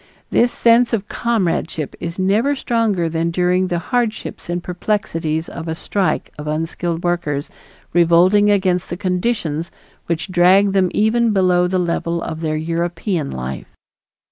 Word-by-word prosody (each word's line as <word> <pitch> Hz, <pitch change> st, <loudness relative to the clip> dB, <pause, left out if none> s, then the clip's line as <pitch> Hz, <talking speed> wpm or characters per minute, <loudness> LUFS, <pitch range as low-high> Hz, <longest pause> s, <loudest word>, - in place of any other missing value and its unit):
This 240 Hz, +1 st, +3 dB
sense 235 Hz, +1 st, +3 dB
of 205 Hz, -3 st, -1 dB
comradeship 180 Hz, -, -1 dB
is 170 Hz, 0 st, -5 dB
never 210 Hz, +9 st, +2 dB
stronger 225 Hz, -9 st, 0 dB
than 165 Hz, +1 st, -1 dB
during 180 Hz, +2 st, +1 dB
the 175 Hz, -, -1 dB
hardships 225 Hz, +2 st, -2 dB
and 175 Hz, 0 st, -2 dB
perplexities 165 Hz, -4 st, -2 dB
of 165 Hz, 0 st, -7 dB
a 160 Hz, -, -2 dB
strike 190 Hz, +3 st, -1 dB
of 150 Hz, -, -6 dB
unskilled 165 Hz, +2 st, -2 dB
workers 165 Hz, -5 st, -1 dB, 0.4 s
revolting 175 Hz, +5 st, +5 dB
against 185 Hz, -3 st, +1 dB
the 175 Hz, -, -4 dB
conditions 180 Hz, -4 st, -1 dB, 0.4 s
which 170 Hz, +2 st, -2 dB
drag 185 Hz, +3 st, +5 dB
them 190 Hz, -2 st, +2 dB
even 220 Hz, +1 st, +2 dB
below 180 Hz, -2 st, +3 dB
the 185 Hz, +1 st, 0 dB
level 170 Hz, -1 st, -1 dB
of 160 Hz, 0 st, -5 dB
their 155 Hz, -1 st, -1 dB
European 170 Hz, 0 st, -2 dB
life. 65 Hz, +1 st, -5 dB
180 Hz, 140 wpm, -19 LUFS, 165-205 Hz, 0.4 s, revolting